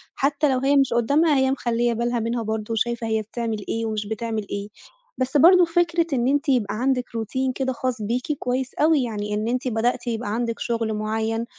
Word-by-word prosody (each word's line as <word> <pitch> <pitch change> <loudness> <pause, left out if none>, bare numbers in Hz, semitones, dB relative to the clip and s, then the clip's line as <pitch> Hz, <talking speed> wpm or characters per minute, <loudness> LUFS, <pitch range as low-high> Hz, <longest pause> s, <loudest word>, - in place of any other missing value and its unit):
حتى 285 +2 +1
لو 255 - +1
هي 275 +2 +2
مش 270 -3 +3
قدامها 285 +7 +3
هي 265 0 +3
مخلّية 240 -2 0
بالها 240 +1 -1
منها 230 +1 -2
برضه 220 0 -3
وشايفة 235 +1 -1
هي 220 0 0
بتعمل 220 -1 -4
إيه 225 0 -1
ومش 215 -1 -2
بتعمل 220 0 -3
إيه. 200 0 -4 0.5
بس 260 +3 0
برضه 355 +5 +7
فكرة 340 0 +1
إن 240 0 +1
أنتِ 285 +2 +1
يبقى 240 -7 +1
عندِك 250 +2 +1
routine 235 +4 -2
كده 260 -1 -1
خاص 250 -2 -3
بيكِ 240 +7 -2
كويس 255 +1 -2
أوي 305 -2 +3
يعني 210 -3 -3
إن 210 +1 -1
أنتِ 250 +2 -1
بدأتِ 240 +1 0
يبقى 225 -2 -2
عندِك 230 0 -2
شغل 230 -2 -1
معيّن 220 +2 -2
235 Hz, 195 wpm, -23 LUFS, 220-265 Hz, 0.5 s, برضه